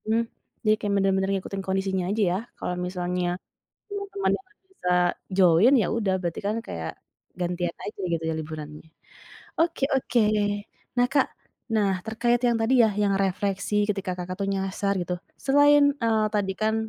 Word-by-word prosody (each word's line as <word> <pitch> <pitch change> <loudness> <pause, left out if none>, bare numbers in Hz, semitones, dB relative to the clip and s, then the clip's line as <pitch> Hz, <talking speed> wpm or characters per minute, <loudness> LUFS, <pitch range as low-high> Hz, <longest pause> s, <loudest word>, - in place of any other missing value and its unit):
Mmm. 225 +1 +2 0.4
Jadi, 215 - +5
kayak 205 -1 0
benar-benar 195 0 +2
ngikutin 195 0 -3
kondisinya 190 -1 0
aja 215 +2 0
ya. 185 - 0 0.2
Kalau 180 - -3
misalnya 180 0 -2 0.5
teman-teman 400 -1 -2
enggak 380 +2 -19
bisa 380 - -4 0.5
join, 185 +6 +6
ya - - +1
udah 210 -5 +1
berarti 170 -2 -3
kan 210 +2 0
kayak 80 -1 -5 0.4
gantian 175 -1 -1
aja 205 - -6
gitu 165 -1 -1
ya 160 - 0
liburannya. 155 0 -7 0.7
Oke 330 -4 +2
oke. 255 -2 +2 0.8
Nah, 245 0 +4
Kak, 275 -2 +3 0.4
nah 200 -4 +2
terkait 235 +2 +1
yang 240 -1 +3
tadi 240 +2 +4
ya, 220 - +3
yang 200 -1 +2
refleksi 200 +2 0
ketika 195 -3 -1
Kakak 180 +1 -4
tuh 195 - 0
nyasar 195 +1 -1
gitu, 180 0 -2 0.2
selain, 285 +1 +5
eee, 220 -2 +2
tadi 200 -2 +1
kan 220 0 +1
195 Hz, 155 wpm, -26 LUFS, 180-230 Hz, 0.8 s, join